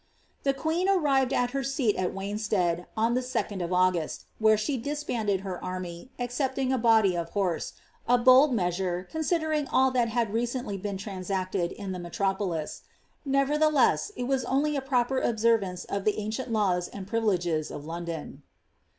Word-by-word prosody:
The 275 -1 +1
queen 330 +6 0
arrived 275 -9 +3
at 245 -2 +1
her 275 0 -2
seat 265 -5 +1
of 180 -1 -1
Wanstead, 195 -3 -1
on 225 +2 +2
the 250 - +1
3d 215 -6 -2
of 170 - -3
Au^sl, 180 -3 +1 0.2
where 220 -1 +5
she 215 +7 -1
disbanded 235 -7 -2
her 190 -2 -6
army, 185 +2 -6
excepting 260 +2 -1
a 260 - +1
body 220 -5 +4
of 170 -1 -3
horse" 185 -4 -1 0.2
— - - -35
a 245 - +5
bold 255 +4 +6
measure, 180 -3 -1
considering 315 -2 0
bU 265 0 +3
(hat 245 -2 +2
had 225 -2 0
recently 240 -3 -2
been 200 0 -3
transacted 185 -2 -2
in 200 -2 -6
the 180 - -4
melro 190 +3 -1
ptilis; 170 -6 -3 0.4
nevertheless, 295 +7 +2
it 250 - -3
was 260 +1 0
only 290 +3 +1
a 275 - 0
proper 260 -1 +1
observance 220 -6 +1
of 200 -1 -3
the 210 - +2
ancient 220 +4 -3
laws 185 -5 +1
and 195 -2 -8
privileges 180 -7 0
of 145 - -7
London. 165 -1 -6
220 Hz, 170 wpm, -27 LUFS, 185-260 Hz, 0.4 s, bold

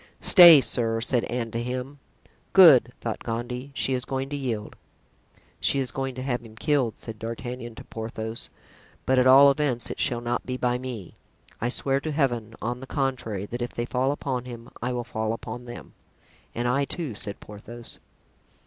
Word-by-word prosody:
"Stay, 170 -5 +9
sir," 115 -3 0
said 120 +1 0
Anne 120 -2 -3
to 115 - -2
him. 125 +3 -5 0.5
"Good," 155 -11 +8
thought 115 -2 -4
Gondy, 120 +3 -4
"she 135 - 0
is 125 -1 -1
going 135 +1 -3
to 145 - -4
yield." 120 -7 -4 0.8
("She - - +2
is 130 -3 -1
going 135 -1 -3
to 130 - -5
have 125 -3 -1
him 110 -2 -14
killed," 135 -3 0
said 110 -2 -8
D'Artagnan 120 +1 -6
to - - -10
Porthos, 110 0 -6 0.6
"but 130 0 +3
at 125 - +4
all 140 +2 +8
events 135 -4 -1
it - - -7
shall 120 -4 0
not 120 +1 -2
be 125 0 -4
by 125 -1 0
me. 125 -8 -7 0.5
I 120 - 0
swear 135 +2 0
to 155 +2 -4
Heaven, 120 -7 -1
on 120 +2 -2
the 135 - -9
contrary, 125 -9 -2
that 120 +4 -6
if 120 - -4
they 120 - -2
fall 130 +2 0
upon 130 -3 -3
him 120 -1 -10
I 125 - -1
will 120 -1 -2
fall 110 -2 -2
upon 120 +1 -7
them." 120 - -10 0.6
"And 120 +1 -1
I, 135 +3 +1
too," 155 -5 -4
said 100 0 -7
Porthos.) 115 +3 -11
125 Hz, 185 wpm, -25 LUFS, 115-135 Hz, 0.8 s, Stay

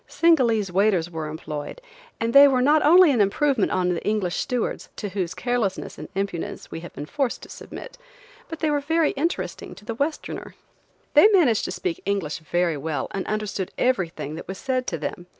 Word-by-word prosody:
Singalese 235 - +3
waiters 185 -3 +2
were 160 -2 -4
employed, 150 - -6 0.4
and 230 +1 -1
they 280 +1 +10
were 255 -2 +2
not 300 +3 +4
only 345 +1 +7
an 240 -5 +2
improvement 225 +3 +2
on 180 -1 +1
the 175 -2 -2
English 205 -5 -1
stewards, 250 -3 -2
to 205 - -5
whose 180 -2 -3
carelessness 230 -2 -2
and - - -8
impudence 195 -3 -4
we 165 - -5
had 170 -1 -9
been 145 - -6
forced 270 - -2
to - - -11
submit, - - -10 0.5
but 325 - -7
they 310 -2 +2
were 290 -1 +1 0.3
interesting 330 +6 -3
to 210 - -15
the 230 - -3
Westerner. 285 +7 -4 0.6
They 300 +8 +8
managed 335 - +3
to - - -3
speak 365 0 -3
English 185 -8 -2
very 170 0 0
well 155 +1 -3
and 195 - -4
understood 210 -3 -2
everything 180 - -1
that 160 - -8
was 190 - -6
said 255 +1 -2
to 165 - -2
them. 175 +3 -5
210 Hz, 185 wpm, -24 LUFS, 175-275 Hz, 0.6 s, they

